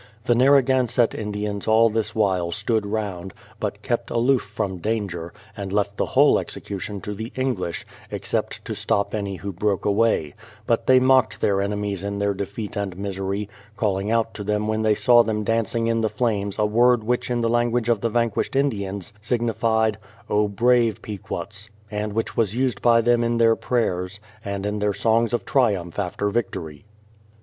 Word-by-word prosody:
The 120 - +4
Narragansett 130 -2 +3
Indians 105 -1 -4
all 110 +1 +5
this 110 -1 -2
while 95 -5 +1
stood 110 +4 -1
round, 100 -4 -4 0.2
but - - -4
kept - - -1
aloof 125 +1 +2
from 100 -2 -4
danger, 95 -5 -3 0.2
and 100 -2 -5
left 100 0 0
the - - 0
whole - - +5
execution 100 0 -6
to 105 - -5
the 110 +3 -6
English, 120 -10 -2 0.2
except - - -3
to - - -4
stop 100 - 0
any 100 -2 -2
who 100 +2 -5
broke 100 +2 -1
away; 105 -8 +2 0.3
but 115 0 0
they 130 0 +7
mocked 130 -2 +3
their 100 -1 +2
enemies 100 -1 -2
in 100 0 -3
their 100 0 +1
defeat 100 +3 -5
and 100 -3 -3
misery, 100 +1 -3 0.3
calling 100 -2 0
out 115 0 +1
to 105 - -6
them 105 +1 -1
when 110 0 0
they 110 -1 +3
saw 120 +1 +6
them 110 -2 -1
dancing 115 +1 0
in 115 0 +1
the 110 - +1
flames 105 -5 -1
a 105 - +2
word 120 +2 +3
which 120 +3 -1
in 120 -1 0
the 115 - +1
language 120 0 +1
of 115 -4 +2
the 115 - 0
vanquished 115 +2 0
Indians 100 -7 -1
signified, 110 -2 0 0.3
O 105 0 +3
brave 115 +2 +2
Pequots! 105 0 -6 0.2
and 105 0 -3
which 115 +1 -2
^vas 110 -2 0
used 130 0 0
by 115 -1 +5
them 120 0 +3
in 115 0 0
their 115 -1 +5
prayers, 95 -6 -1 0.2
and 100 -1 -4
in 105 0 -2
their 105 0 +1
songs 115 +2 +2
of 120 - -1
triumph 100 -10 +1
after 100 +1 -1
victory. 85 -8 -3
105 Hz, 175 wpm, -23 LUFS, 100-115 Hz, 0.3 s, they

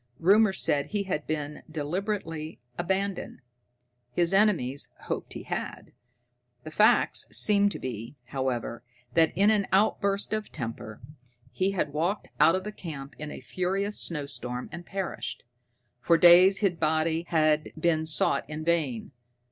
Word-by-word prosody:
Rumor 200 +4 +5
said 145 -6 +1
he 205 +4 -2
had 175 -6 -3
been 150 -1 -4
deliberately 160 0 -4 0.2
abandoned. 190 -1 -2 0.7
His 170 +7 +1
enemies 180 -10 +2
hoped - - -5
he - - -7
had. - - -5 0.7
The 155 - -8
facts 215 +7 +3
seemed 205 -1 +4
to - - -5
be, 115 +1 -6
however, 130 -4 -3 0.3
that 160 +1 +4
in 200 +3 +5
an 205 -3 +1
outburst 200 0 +1
of 215 -1 -3
temper 115 -5 -6 0.5
he 190 +1 0
had 150 -6 -2
walked 175 +7 -1
out 165 - +6
of 205 +3 -4
camp 145 -5 -8
in 150 0 -5
a - - -8
furious 195 +3 -1
snowstorm 140 -5 -3
and 175 0 -8
perished. 195 -2 -4 0.6
For 165 +7 +3
days 180 +4 +7
his 200 -3 +3
body 160 +1 0
had 155 -1 +2
been 160 -1 +1
sought 155 - +1
in 155 +1 -5
vain. 155 -9 0
165 Hz, 140 wpm, -27 LUFS, 150-195 Hz, 0.7 s, days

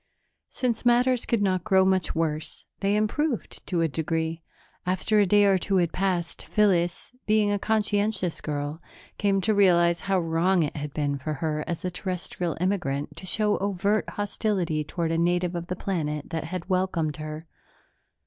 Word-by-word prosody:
Since 240 -3 -1
matters 245 0 +3
could 230 -3 +1
not 185 -3 +1
grow 190 -2 +4
much 190 -2 +1
worse, 160 -1 -2
they 200 +1 +1
improved 235 +5 -1
to 175 -3 0
a 165 - +3
degree. 160 +2 -2 0.4
After 185 +4 +1
a 205 - +4
day 205 +2 +5
or 195 -2 +4
two 195 +3 -1
had 170 -2 +1
passed, 180 -3 -1
Phyllis, 180 -5 +1 0.2
being 210 -1 +3
a 205 - 0
conscientious 205 -4 0
girl, 145 +1 -3 0.4
came 200 -1 +2
to 215 +3 +2
realize 175 -4 +4
how 195 -1 +1
wrong 170 +2 +2
it 150 - -3
had 150 -1 -4
been 145 -1 -1
for 150 +3 -3
her 150 +1 -2
as 170 +1 -4
a 180 - -1
Terrestrial 180 -2 -3
immigrant 175 -7 -1
to 185 - -8
show 210 +1 +1
overt 200 +2 0
hostility 195 -6 -1
toward 165 +2 -2
a 165 - +1
native 175 +1 +1
of 170 -1 -4
the 180 - -3
planet 150 -6 -3
that 160 -1 -2
had 180 +1 -5
welcomed 185 -5 0
her. 155 +1 -6
180 Hz, 170 wpm, -26 LUFS, 165-205 Hz, 0.4 s, day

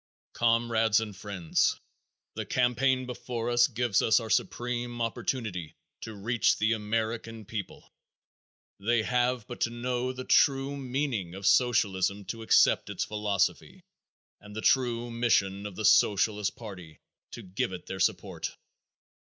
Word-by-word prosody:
_ - - -65
Comrades 115 -2 +2
and 105 -3 -5
friends, 100 -5 0 0.5
the - - -4
campaign 130 +1 +1
before 120 -1 -4
us 120 0 +5
gives 120 -5 +1
us 110 - +4
our 110 -2 -6
supreme 120 +1 -1
opportunity 110 - -3 0.3
to 110 -1 -7
reach 115 +4 +1
the 110 +2 +2
American 110 +1 -3
people. 105 -1 -7 0.9
They 110 +3 +1
have 125 -1 0
but 120 - -9
to - - +2
know 125 +1 -2
the 130 0 -7
true 135 0 +3
meaning 130 -9 -3
of 100 0 -7
Socialism 100 -4 +2
to 115 - -10
accept 110 - +4
its - - -2
philosophy 105 - -1 0.6
and 105 0 -13
the 110 - -4
true 120 -2 +1
mission 105 -4 +1
of 100 - -10
the 110 - -3
Socialist 105 0 +3
party 90 -8 -10 0.3
to - - -9
give 95 +1 -2
it 90 - -8
their 95 - -6
support. 95 - -1
115 Hz, 140 wpm, -28 LUFS, 105-120 Hz, 0.9 s, us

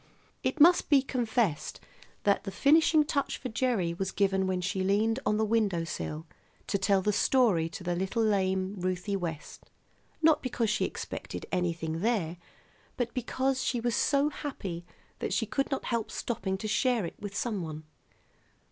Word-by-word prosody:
It - - -1
must 345 +4 +6
be 280 -3 +5
confessed 235 - -1 0.4
that 200 -1 +2
the 195 - -4
finishing 305 +8 +4
touch 285 -2 -1
for 255 - -5
Gerry 220 -8 0
was 190 +2 -3
given 195 -1 +1
when 185 -1 0
she 190 +2 -2
leaned 215 +5 +2
on 210 0 +2
the 220 - +2
window 210 -6 +1
sill 160 -1 -5 0.4
to 200 - -1
tell 195 0 +2
the 210 - +2
story 210 -9 +3
to 175 - -8
little 190 +6 -1
lame 190 -2 +1
Ruthie 185 +2 -1
West, 165 -5 -6 0.5
not 320 -1 +4
because 235 -4 -1
she 210 - +1
expected - - -6
anything 165 -2 -1
there, 185 -5 0 0.6
but 245 -2 -2
because 260 +2 -1
she 245 - 0
was 240 0 0
so 285 +1 +2
happy 195 - -6 0.3
that - - -2
she 225 - +1
could 275 +6 -1
not 270 - -2
help 230 -2 -1
stopping 195 -5 -3
to 215 - -4
share 235 -1 +1
it - - -6
with 200 -1 -7
some 215 -6 -1
one. 155 -2 -6
205 Hz, 165 wpm, -29 LUFS, 185-245 Hz, 0.6 s, must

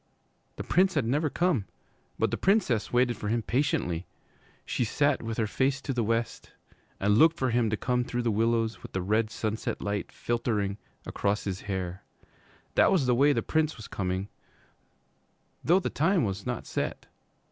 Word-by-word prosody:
The - - -5
Prince 185 +1 +2
had 140 -6 +1
never 145 +6 +1
come, 165 - +1 0.5
but - - +1
the - - +1
Princess 185 - +2
waited 125 0 +2
for 105 - -5
him 115 +2 0
patiently. 105 - 0 0.6
She - - -1
sat 145 +5 +1
with 115 -1 -4
her 115 - +1
face 135 +5 0
to 135 - -3
the 120 -2 0
west 115 +1 -2 0.5
and 105 +2 +3
looked 165 +1 +6
for 130 -4 0
him 115 -1 +2
to 110 - -1
come 125 +1 0
through 120 0 -3
the 115 - +1
willows 115 +1 +1
with - - -11
the 95 - -1
red 110 +3 +1
sunset 110 0 -3
light 100 -1 -3
filtering 110 -4 -1 0.3
across 100 +1 -1
his 95 -1 -4
hair. 95 -2 -4 0.7
That - - +5
was 170 -8 +3
the 125 - +3
way 140 +4 +5
the - - 0
Prince 155 -2 0
was 110 - -9
coming, 95 0 -2 1.4
though 175 +4 +4
the - - -3
time 170 +2 +2
was 100 -2 -3
not - - -3
set. - - -3
115 Hz, 180 wpm, -28 LUFS, 105-140 Hz, 1.4 s, looked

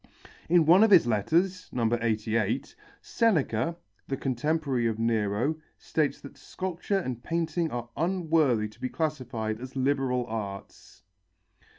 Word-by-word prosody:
In 170 -1 +5
one 180 +6 +7
of 220 - +5
his 185 -10 +7
letters 170 - 0
(No. 115 -2 0
88) 115 +1 -1 0.3
Seneca, 170 - +1 0.3
the 135 - -2
contemporary 135 -1 0
of 110 -1 -1
Nero, 115 +5 0 0.2
states 155 -3 -1
that 140 - -12
sculpture 185 +2 -3
and 130 -10 -3
painting 165 0 -1
are 120 -2 -5
unworthy 160 - +1
to 110 +3 -19
be 130 - -2
classified 125 -9 -3
as 130 +2 -9
liberal 130 -2 0
arts. 105 -4 -7
135 Hz, 125 wpm, -28 LUFS, 115-165 Hz, 0.3 s, one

